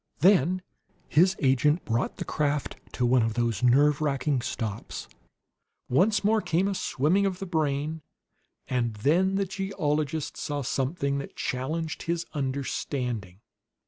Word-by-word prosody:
Then 185 0 +4 0.4
his 180 +5 +4
agent 145 +5 +3
brought 115 +1 -1
the - - -4
craft 150 -1 -1 0.2
to 125 - 0
one 125 +1 +4
of 110 -1 0
those 120 -4 0
nerve 140 +4 +4
racking 140 -2 0
stops; 110 -4 -4 0.8
once 200 - +3
more 215 +1 +3
came 180 +1 +1
a 200 - 0
swimming 185 +3 +1
of 185 -2 -3
the 195 - -5
brain, 155 -2 -1 0.7
and 120 -3 -1
then 175 - +2
the 195 0 +1
geologist 160 -6 -2
saw 145 -2 -3
something 140 +2 -1
that 140 - -8
challenged 155 +5 -3
his 170 0 -2
understanding. 130 - -3
145 Hz, 135 wpm, -27 LUFS, 130-175 Hz, 0.8 s, Then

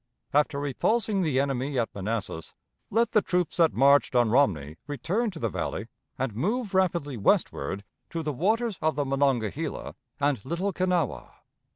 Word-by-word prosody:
After 145 0 +2
repulsing 200 - +1
the 150 -7 +1
enemy 135 0 -1
at 115 -2 0
Manassas, 100 -4 -4 0.3
let 230 +2 +2
the 215 - +4
troops 180 -3 -1
that 165 -2 +5
marched 140 0 +4
on 120 -3 +4
Romney 80 - +2
return 175 - -1
to 185 - -9
the 115 - -1
Valley 105 - -4 0.3
and 130 -4 -2
move 210 - -1
rapidly 170 -8 +1
westward 100 -2 +1 0.3
to 165 -1 -3
the 150 -1 -2
waters 215 - 0
of 155 -1 +1
the 145 -1 0
Monongahela 135 +1 -1 0.3
and 140 -7 +1
Little 180 +7 -2
Kanawha. 180 - 0
145 Hz, 155 wpm, -27 LUFS, 125-180 Hz, 0.3 s, that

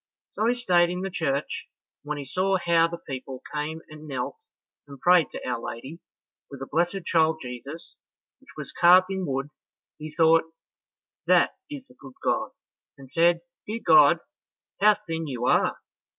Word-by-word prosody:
So 220 - -1
he 245 - +2
stayed 175 -8 +3
in 180 +1 -3
the 195 0 -4
church, 140 -4 -2 0.3
and 145 - -14
when 150 - -2
he 140 - -6
saw 190 +6 +1
how 170 -2 +3
the 170 0 -6
people 130 -3 -8
came 155 +2 -4
and 155 0 -12
knelt 130 - -4 0.5
and 140 -1 -12
prayed 175 -3 +4
to - - -8
Our 120 -2 -2
Lady 135 +10 -7 0.5
with 140 - -10
the 135 - -5
blessed 175 +5 -1
child 160 -1 +2
Jesus 135 +6 -9 0.4
which 270 +1 -24
was 140 -2 -8
carved 185 +2 +6
in 190 -2 -3
wood, 135 +1 -3 0.5
he 155 0 -7
thought 160 +1 +4 0.8
"that - - +4 0.2
is 285 -3 -8
the - - -19
good 135 -2 -14
God," - - 0 0.5
and 135 -1 -14
said, 170 +2 +3 0.3
"Dear 225 +2 -4
God, 155 0 +7 0.6
how 210 +1 +6
thin 165 -6 -5
you 125 -3 -3
are! - - +2
160 Hz, 170 wpm, -26 LUFS, 140-180 Hz, 0.8 s, God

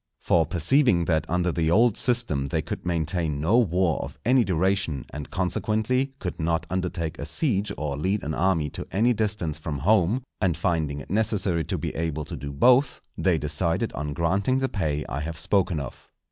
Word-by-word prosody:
For 80 -3 +2
perceiving 90 - +3
that 80 -2 0
under 90 0 +1
the 80 -1 0
old 115 +5 +4
system 115 - 0
they - - -1
could - - -5
maintain 80 -3 -1
no 90 +11 +3
war 90 - +1
of - - -7
any 125 +1 +5
duration, 95 -5 0
and, 75 -1 -6
consequently, 110 +8 0
could 90 -9 -5
not 80 0 0
undertake 85 -3 -2
a - - -4
siege 105 -10 0
or 75 -2 -2
lead 95 +7 -1
an 80 - -3
army 80 -5 +1
to - - -7
any 115 +5 +3
distance 100 -8 -2
from 75 -2 -4
home, 105 - +2 0.2
and 90 -6 +1
finding 80 -4 -1
it 70 - -11
necessary 100 -5 +1
to - - -2
be - - -4
able 80 -2 -2
to - - -6
do 70 0 -6
both, 125 - +4 0.2
they 90 -3 +2
decided 80 +3 -1
on 75 0 -4
granting 95 - +1
the 135 0 +1
pay 75 -7 -2
I 65 - -3
have 80 +2 -5
spoken 90 -1 +1
of. 70 -4 -8
85 Hz, 190 wpm, -25 LUFS, 80-105 Hz, 0.2 s, any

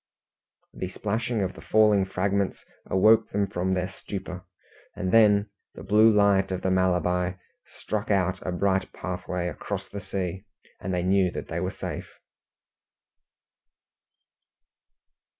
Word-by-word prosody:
The 95 - -5
splashing 110 +2 -2
of 95 - -2
the - - -12
falling 105 -3 +4
fragments 100 +1 -1 0.2
awoke 110 +4 +4
them 100 0 0
from 95 0 -1
their 90 0 -1
stupor, 95 -2 -7 0.5
and 90 0 -2
then 105 -2 +5 0.2
the - - -9
blue 110 +2 +5
light 100 -2 +3
of 95 - -3
the 95 - +1
Malabar 90 0 +1 0.3
struck 110 0 -5
out 95 -2 +1
a 90 - -3
bright 95 +1 0
pathway 90 -1 -4
across 90 - -5
the 100 - -6
sea, 95 0 -4 0.3
and 95 - -4
they 90 -1 0
knew 95 0 +3
that - - -6
they 85 - -2
were 90 +1 -1
safe. - - -7
95 Hz, 130 wpm, -26 LUFS, 90-100 Hz, 0.5 s, then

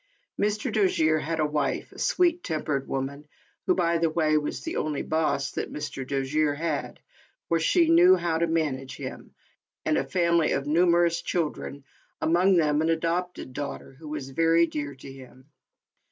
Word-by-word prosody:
Mr. 210 0 0
Dojere 160 -7 +2
had 165 +1 -3
a 155 - +3
wife, 150 -2 -2
a - - -13
sweet 350 -1 +2
tempered 150 -4 -2
wo 135 - -1
man, 140 +2 -6 0.4
who, - - +4
by 170 -2 +1
the 165 0 +2
way, 155 -1 +1
was 150 -1 -1
the 325 - -4
only 150 -2 -2
"boss" 155 -3 0
that - - -4
Mr. 140 -2 -5
Dojere 145 +2 0
had, 155 -2 -3 0.5
for 165 - +2
she 335 - +3
knew 350 +3 +7
how 165 - -1
to 170 - +2
manage 150 -5 -2
him, - - -8 0.5
and - - +2
a - - 0
family 170 -2 +2
of 135 - -1
numerous 170 +2 +3
children, 150 -4 -3 0.4
among 180 +4 +3
them 150 -2 +2
an 160 - +1
adopted 165 -3 -2
daughter, 145 0 -6
who 160 - -10
was 145 -3 -5
very 165 +3 +4
dear 145 -3 -5
to 135 +1 -11
him. 130 -1 -14
160 Hz, 170 wpm, -26 LUFS, 145-170 Hz, 0.5 s, knew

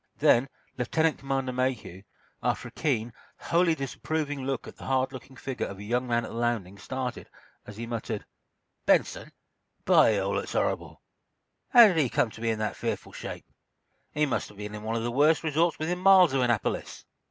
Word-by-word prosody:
Then 125 +3 +4 0.3
Lieutenant 160 +5 +1
Commander 135 -1 -2
Mayhew, 125 -8 -2 0.4
after - - -1
a - - -20
keen, 120 -7 -1 0.2
wholly 170 -1 +2
disapproving 145 0 -3
look 135 -1 -3
at - - -11
the - - -10
hard 130 0 +1
looking 130 +1 -10
figure 130 0 -4
of 100 - -8
a 100 - -9
young 120 +4 -1
man 120 -1 +1
at - - -8
the - - -6
landing, 110 -5 -2
started, 130 +3 -5 0.4
as 105 0 -10
he 115 - -4
muttered: 115 -2 -4 0.6
"Benson, - - +2 0.5
by 110 - +5
all 100 0 -1
that's - - -3
horrible! - - -2 0.7
How 240 -1 +9
did 180 -5 0
he 145 -6 +3
come 115 - +1
to 110 - -12
be 115 - 0
in 110 - 0
that 110 0 -2
fearful - - -4
shape? - - -7 0.7
He 150 0 +1
must 135 - -2
have 105 - -16
been 105 0 -6
in 105 - -6
one 110 +1 -3
of 115 - -1
the 120 - -1
worst 150 +6 +3
resorts 160 +2 +1
within 175 +3 -2
miles 185 -4 +6
of 135 - +2
Annapolis!" 120 -4 -1
125 Hz, 190 wpm, -27 LUFS, 115-150 Hz, 0.7 s, How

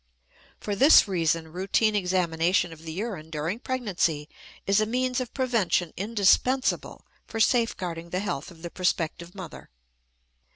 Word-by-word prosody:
For 205 - -3
this 275 +2 +7
reason 165 -3 -1
routine 200 +4 +1
examination 180 -2 +1
of 160 - -14
the 160 - -5
urine 185 -3 -5
during 160 +7 -3
pregnancy 190 - -1 0.4
is 195 +2 +3
a 215 - 0
means 250 +2 0
of 250 -2 -4
prevention 225 - 0
indispensable 230 +6 +1 0.2
for 225 - -5
safeguarding 185 -8 0
the 180 - -2
health 175 -7 -4
of 170 -2 -16
the 170 - -6
prospective 170 0 -2
mother. 185 -4 -9
185 Hz, 135 wpm, -26 LUFS, 165-225 Hz, 0.4 s, this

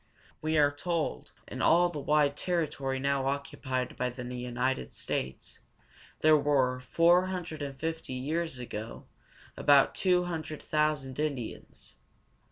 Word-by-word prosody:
We 155 0 +1
are 145 -1 +5
told 165 +2 -3
that - - -11
in - - -4
all 175 +2 +5
the 155 -4 -5
wide 145 0 +2
territory 150 -6 -1
now 140 0 0
occupied 130 -2 -3
by 125 - 0
the 125 0 -7
United 125 +1 -2
States, 65 0 -4 0.6
there 155 0 +6
were, 135 -4 +2
four 170 +7 +4
hundred 175 -5 -5
and 140 -2 -5
fifty 160 -4 -4
years 150 +3 -2
ago, 115 -2 -7 0.5
about 140 -1 +5
two 180 -2 +2
hundred 155 -3 -5
thousand 150 -3 0
Indians. 140 -7 -5
145 Hz, 135 wpm, -30 LUFS, 130-160 Hz, 0.6 s, there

